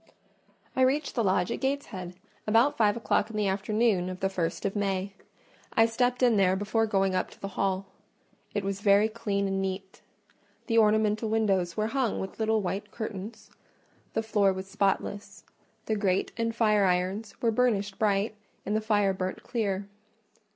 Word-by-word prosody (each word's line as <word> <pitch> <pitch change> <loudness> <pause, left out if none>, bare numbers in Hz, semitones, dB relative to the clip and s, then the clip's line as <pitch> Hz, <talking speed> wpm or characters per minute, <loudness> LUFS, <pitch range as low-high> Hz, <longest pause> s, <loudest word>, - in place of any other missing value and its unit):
I 260 - +1
reached 275 +3 +2
the 235 - 0
lodge 185 -2 +1
at - - -2
Gateshead 235 -10 -3 0.3
about 230 +6 +4
five 210 -1 +3
o'clock 220 -2 +1
in 220 - -5
the 210 - +1
afternoon 195 -1 +1
of 185 0 -6
the 195 - 0
first 170 -3 -2
of 195 - -1
May: 195 -1 -1 0.6
I 225 - +5
stepped 245 +2 0
in 240 -3 +5
there 190 -1 +4
before 215 +3 0
going 195 -2 +1
up 185 - 0
to - - -17
the 195 - -5
hall. 195 0 -1 0.7
It 205 - 0
was 195 0 -3
very 205 +1 +5
clean 205 -3 -2
and 195 0 -1
neat: 190 0 -5 0.6
the 230 -2 +3
ornamental 215 0 +2
windows 195 -5 +1
were 215 - +1
hung 245 0 0
with 190 - -6
little 220 -1 +1
white 195 +3 -3
curtains; 215 -1 -7 0.6
the 225 - 0
floor 210 -3 +3
was 190 0 -5
spotless; 200 +1 -2 0.4
the 220 - 0
grate 195 -3 0
and 230 -1 -1
fire 210 -3 +3
irons 190 +4 -1
were 230 - +2
burnished 210 -4 0
bright, 205 0 +1 0.3
and 210 - -1
the 215 - +1
fire 205 -3 +2
burnt 185 0 -4
clear. 200 -4 -2
205 Hz, 170 wpm, -28 LUFS, 195-225 Hz, 0.7 s, I